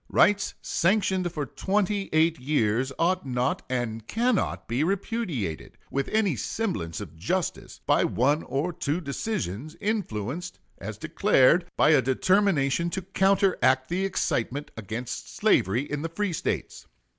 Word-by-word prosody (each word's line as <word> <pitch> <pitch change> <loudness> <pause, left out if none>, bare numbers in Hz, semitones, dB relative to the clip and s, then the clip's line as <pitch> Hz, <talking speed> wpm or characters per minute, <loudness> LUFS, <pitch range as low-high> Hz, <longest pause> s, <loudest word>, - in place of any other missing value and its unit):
Rights 200 -1 +3
sanctioned 190 -1 +1
for 150 -3 -3
twenty 200 - -1
eight 160 +1 +3
years 125 -2 +1
ought 180 +2 +1
not 125 -1 -1
and 115 -3 -3
cannot 235 -2 0
be 120 +5 0
repudiated, 180 - -2
with 140 0 -1
any 210 -8 +1
semblance 105 - -3
of 85 -6 -9
justice, 170 - -3
by - - +3
one 145 +6 +2
or 155 +6 -2
two 150 +1 -1
decisions, 155 - -4
influenced, 175 - -3 0.2
as 105 +1 -6
declared, 165 - +3
by - - +5
a 150 - +6
determination 170 - +2
to 190 +2 -4
counteract 190 - +2
the 180 +3 0
excitement 145 -7 -1
against 110 +3 -6
slavery 110 +8 +2
in 145 0 -4
the 165 - -3
free 185 +2 -2
States.... - - -3
155 Hz, 135 wpm, -26 LUFS, 125-190 Hz, 0.2 s, a